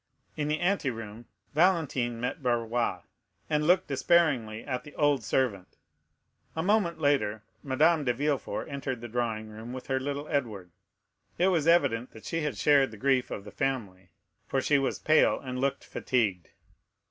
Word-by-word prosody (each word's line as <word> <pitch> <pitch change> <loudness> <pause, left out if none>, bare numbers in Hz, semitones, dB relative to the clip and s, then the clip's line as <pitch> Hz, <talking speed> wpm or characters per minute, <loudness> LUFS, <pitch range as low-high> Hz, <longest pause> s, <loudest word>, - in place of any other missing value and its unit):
In 150 -1 -2
the 155 +1 0
anteroom, 120 - -2 0.3
Valentine 150 -8 +2
met 125 +7 -3
Barrois, 120 -6 0 0.5
and 150 0 +1
looked 185 +1 +4
despairingly 130 -7 +2
at 130 -3 -3
the 150 - -13
old 145 -5 +2
servant. 105 -9 -1 0.8
A 160 - -1
moment 185 -4 +1
later, 135 -8 +1 0.2
Madame 155 +4 +3
de 125 - +2
Villefort 140 +3 -2
entered 135 -4 -4
the 120 - -6
drawing 110 -2 -2
room 110 +3 -8
with 130 -1 -7
her 130 -1 0
little 145 +2 -4
Edward. 110 - -2 0.7
It 180 +2 +3
was 165 -4 +1
evident 140 -8 +3
that 110 - -13
she 165 - -2
had 150 -8 -2
shared 140 +2 +4
the 110 - -11
grief 130 +2 +1
of 100 - -5
the 105 - -10
family, 105 -10 -3 0.4
for 135 - 0
she 140 +2 +3
was 135 - -1
pale 155 0 +3
and 125 -2 -5
looked 140 0 -1
fatigued. 100 -9 -1
130 Hz, 160 wpm, -28 LUFS, 115-150 Hz, 0.8 s, looked